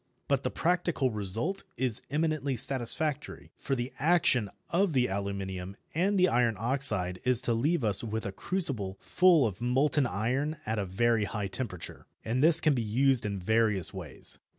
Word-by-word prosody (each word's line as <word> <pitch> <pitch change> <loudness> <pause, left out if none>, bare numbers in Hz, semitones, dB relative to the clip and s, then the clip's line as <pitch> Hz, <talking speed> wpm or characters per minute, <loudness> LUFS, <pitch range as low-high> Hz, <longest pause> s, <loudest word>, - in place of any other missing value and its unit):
But - - +1
the - - -2
practical 170 -6 0
result 110 - 0
is 125 -4 0
eminently 150 -2 -1
satisfactory, 140 +5 0
for 135 - -3
the 125 +1 -4
action 155 - +2 0.2
of 180 0 +2
the 125 -2 +3
aluminium 95 -1 -4 0.2
and 190 +5 +1
iron 120 -6 +2
oxide 110 -7 -1
is 125 -2 +2
to 120 - +1
leave 145 +6 0
us 105 -1 +3
with 110 0 -4
a 100 - -3
crucible 115 - -2
full 175 -6 +4
of 110 0 -4
molten 135 +3 +2
iron 130 +9 -2
at 110 0 -2
a 100 - -2
very 115 +3 +1
high 105 -2 -4
temperature. 95 -5 -6 0.2
And 125 +5 0
this 165 0 +6
can 155 - +3
be 125 - -1
used 120 +1 +1
in 100 -1 -3
various 105 -2 +1
ways. 85 -9 -6
120 Hz, 165 wpm, -29 LUFS, 105-150 Hz, 0.2 s, this